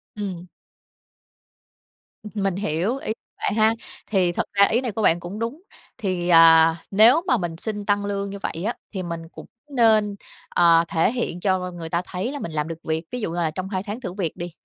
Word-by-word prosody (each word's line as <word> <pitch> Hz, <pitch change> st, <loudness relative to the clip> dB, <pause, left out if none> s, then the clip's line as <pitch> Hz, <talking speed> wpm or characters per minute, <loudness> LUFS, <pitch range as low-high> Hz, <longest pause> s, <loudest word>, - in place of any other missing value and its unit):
Ừm. 185 Hz, -4 st, -5 dB, 1.9 s
Mình 195 Hz, -3 st, 0 dB
hiểu 195 Hz, -, -1 dB
ý 245 Hz, -, -4 dB, 0.3 s
bạn -, -, -1 dB
ha. 220 Hz, +1 st, +4 dB, 0.3 s
Thì 185 Hz, -4 st, +2 dB
thật -, -, -1 dB
ra 200 Hz, 0 st, +6 dB
ý 235 Hz, +3 st, +2 dB
này 245 Hz, -4 st, -2 dB
của 220 Hz, -, -3 dB
bạn 170 Hz, -3 st, +4 dB
cũng 180 Hz, +5 st, -7 dB
đúng, 235 Hz, +9 st, -4 dB, 0.4 s
thì, 180 Hz, -3 st, -2 dB
à, 165 Hz, 0 st, +6 dB
nếu 230 Hz, +10 st, +7 dB
mà 250 Hz, -, +3 dB
mình 170 Hz, -4 st, -3 dB
xin 210 Hz, 0 st, -5 dB
tăng 205 Hz, 0 st, +1 dB
lương 200 Hz, 0 st, -2 dB
như 200 Hz, -, -6 dB
vậy 170 Hz, -2 st, -4 dB
á, 235 Hz, -, 0 dB, 0.2 s
thì 190 Hz, -3 st, -4 dB
mình 165 Hz, -1 st, -6 dB
cũng -, -, -11 dB, 0.2 s
nên, 220 Hz, -5 st, +3 dB, 0.3 s
ờ, 165 Hz, -1 st, +5 dB
thể 165 Hz, +6 st, +2 dB
hiện 235 Hz, -8 st, -3 dB
cho 185 Hz, -1 st, 0 dB
người 165 Hz, -2 st, -7 dB
ta 170 Hz, +1 st, 0 dB
thấy 190 Hz, +9 st, -3 dB
là 290 Hz, -, -5 dB
mình 170 Hz, -, -5 dB
làm 150 Hz, 0 st, -2 dB
được 165 Hz, -, -5 dB
việc. 160 Hz, +1 st, -2 dB
Ví 250 Hz, -1 st, -3 dB
dụ 170 Hz, -, -2 dB
như 175 Hz, -, -5 dB
là 165 Hz, -2 st, 0 dB
trong 185 Hz, +3 st, -5 dB
2 190 Hz, -1 st, -2 dB
tháng 215 Hz, +5 st, -6 dB
thử 185 Hz, -5 st, -5 dB
việc 185 Hz, -6 st, -3 dB
đi, 175 Hz, 0 st, -5 dB
190 Hz, 215 wpm, -23 LUFS, 170-215 Hz, 1.9 s, nếu